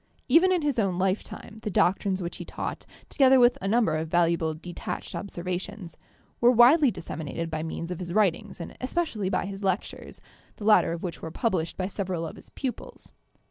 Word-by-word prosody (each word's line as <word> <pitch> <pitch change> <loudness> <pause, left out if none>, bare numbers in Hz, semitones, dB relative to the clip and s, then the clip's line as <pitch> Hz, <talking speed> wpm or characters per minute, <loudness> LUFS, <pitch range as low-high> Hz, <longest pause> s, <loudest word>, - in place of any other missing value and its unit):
Even 370 +3 +5
in 355 -4 +1
his 285 -5 0
own 190 -4 +1
lifetime 195 +3 -3
the 215 - -3
doctrines 190 0 +1
which 170 - -5
he - - -6
taught, - - -6 0.2
together 265 -2 +5
with 245 0 +6
a 195 - -2
number 225 -4 +2
of 160 +1 -2
valuable 165 -1 +1
detached 175 +2 -6
observations, 185 0 -5 0.4
were 240 - +6
widely 255 +5 +6
disseminated 165 -4 -5
by 155 0 -2
means 165 +2 -5
of 180 - -4
his 175 -2 -5
writings 205 0 +1
and 170 - -7
especially 255 - -1
by - - 0
his 195 +1 -7
lectures, 190 0 -3 0.4
the 205 - -8
later 215 -5 +5
of 170 0 -5
which 175 -3 -5
were 160 - -5
published 170 -3 -1
by 185 - -1
several 185 -3 -3
of 160 - -7
his - - -14
pupils. 260 -3 -6
190 Hz, 185 wpm, -27 LUFS, 170-230 Hz, 0.4 s, with